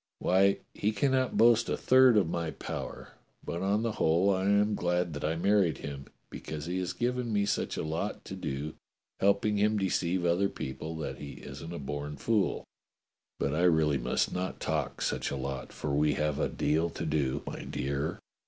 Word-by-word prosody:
Why, 95 +2 +3 0.2
he 105 +2 0
cannot 130 +4 +1
boast 115 0 +5
a - - 0
third 130 -3 +6
of 95 -5 +3
my 85 -1 -2
powder, - - -6 0.4
but 85 - -3
on 100 +3 +1
the 115 - 0
whole 90 0 +3
I 95 0 -1
am 100 +1 +3
glad 90 -3 0
that 75 - -5
I 80 +1 0
married 95 -1 +2
him, 70 -1 -7 0.3
because 75 0 -6
he 90 +2 -2
has 90 -1 -2
given 125 -1 -1
me 100 -1 +2
such - - -1
a - - -1
lot 80 +1 -3
to - - -6
do 70 +3 -4 0.5
helping 100 +2 +3
him 105 +1 +3
deceive 90 -2 0
other 90 +3 +2
people 80 +5 -5
that 80 -2 -5
he 70 -1 -7
isn't 80 - -9
a 85 - -5
born 75 +1 -5
fool. 110 +4 0 0.7
But 70 - -1
I 80 - +1
really 80 -5 +3
must 60 +1 0
not 90 +1 -3
talk - - -2
such - - -1
a 70 - -3
lot, 65 -1 -4
for 75 - -4
we 75 +1 +3
have 75 -1 0
a - - +1
deal 80 +3 +1
to - - -5
do, 75 -3 0
my - - -6
dear. 70 +3 -2
85 Hz, 190 wpm, -30 LUFS, 75-100 Hz, 0.7 s, third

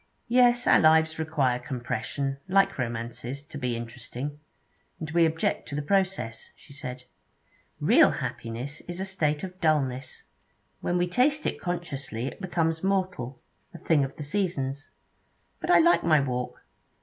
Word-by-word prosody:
'Yes, 245 0 +4
our - - +6
lives 160 0 +4
require 145 -6 +1
compression, 130 +2 -3
like 195 -2 +3
romances, 120 +3 -4
to 145 - -14
be 125 -4 -1
interesting, 125 +5 -6 0.6
and 160 -1 -5
we 165 0 +5
object 160 +1 -1
to 140 - -5
the 150 - -2
process,' 190 - 0
she 150 -2 -16
said. 125 -2 -7 0.8
'Real - - +6
happiness 120 +6 -5
is 175 +1 -5
a 190 - -2
state 155 -5 0
of 185 0 -7
dulness. 135 -5 0 0.6
When 175 - 0
we 175 0 +2
taste 280 +10 +2
it - - -2
consciously 145 - -3
it 140 - -6
becomes 165 -3 0
mortal 185 -10 -1 0.3
a - - -6
thing 155 -4 +2
of 135 0 -4
the 150 - -6
Seasons. 145 -5 -2 0.7
But - - -5
I 355 - +8
like 340 +1 +5
my 155 -2 +5
walk. 125 -2 -3
150 Hz, 150 wpm, -27 LUFS, 130-180 Hz, 0.8 s, I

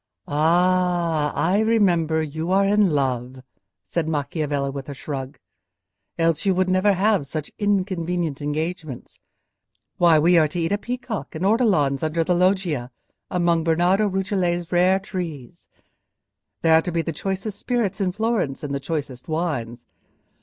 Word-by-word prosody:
"Ah! 170 0 +2
I 195 +3 +2
remember, 175 -8 +2
you 160 +3 -4
are 195 +1 +4
in 205 -1 +3
love," 130 -3 -2 0.4
said 160 - -2
Macchiavelli, 145 -2 -2
with 140 0 -7
a 140 - -6
shrug, 135 0 -6 0.8
"else 165 -2 +1
you 195 -2 +2
would 185 0 +1
never 185 +2 +3
have 195 -5 +1
such 155 0 -5
inconvenient 180 -6 -1
engagements. 155 -2 -4 0.8
Why, 170 -2 +5
we 170 +3 +5
are 155 - +4
to 165 +4 -5
eat 165 +1 -1
a 205 - +1
peacock 240 -5 -5
and 165 +4 -2
ortolans 190 - +2
under 160 +1 0
the 180 - +1
loggia 180 -8 +1 0.4
among 170 -2 +1
Bernardo 175 +6 +2
Rucellai's 185 -3 -1
rare 180 +2 +4
trees; 170 - -7 0.9
there 165 -1 +5
are 160 - +6
to 175 - -4
be 165 -1 0
the 165 - -3
choicest 195 +5 -4
spirits 235 -6 -1
in 185 -2 +1
Florence 205 - -1
and 145 -1 -3
the 140 - -1
choicest 140 -2 -5
wines. 140 -8 -3
170 Hz, 145 wpm, -23 LUFS, 150-190 Hz, 0.9 s, are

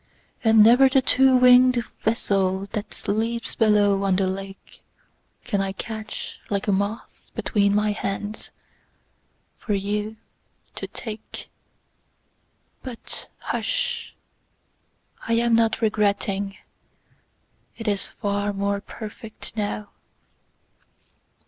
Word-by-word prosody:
And 220 -2 +7
never 245 +4 +7
the 270 +1 +4
two 265 0 +5
winged 250 -1 +6 0.2
vesselThat 200 -2 0
sleeps 225 +3 -2
below 205 -3 +3
on 195 -1 +2
the 195 - +2
lakeCan 195 +3 -7
I 195 0 -1
catch 215 +2 -6
like 200 0 -1
a - - +3
moth 200 +3 -3
between 200 -2 +2
my 210 0 +2
handsFor 205 0 -7
you 210 +2 -3 0.6
to - - -6
take. 220 -3 -8 1.3
But 250 -3 -7
hush, 485 -2 -2 1.1
I 230 - +1
am 235 0 +3
not 225 0 +3
regretting:It 200 +1 -4
is 205 -2 0
far 205 0 -2
more 200 0 -1
perfect 220 0 -9
now. 210 -1 -3
210 Hz, 90 wpm, -24 LUFS, 200-230 Hz, 1.3 s, And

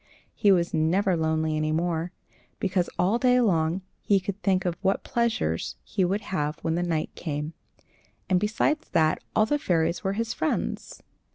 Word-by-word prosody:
He 205 - +4
was 175 -2 +2
never 175 +4 +2
lonely 160 -1 0
any 155 0 0
more, 165 +1 -1 0.5
because 185 -2 0
all 200 +6 +2
day 250 0 +4
long 175 -5 +1 0.2
he 200 -1 +3
could 195 +2 -5
think 190 -2 +1
of 175 -2 0
what 195 -1 +1
pleasure 225 - 0 0.2
he 190 - -1
would 195 +4 0
have 150 -6 -2
when 160 - 0
the 170 - 0
night 165 -3 -1
came; 150 -1 -4 0.7
and, 185 -2 +3
besides 225 - 0
that, 155 -1 +3 0.2
all 215 - +5
the 295 +6 0
fairies 170 - 0
were 195 0 0
his 230 +2 -2
friends. 110 - -3
175 Hz, 170 wpm, -26 LUFS, 160-200 Hz, 0.7 s, all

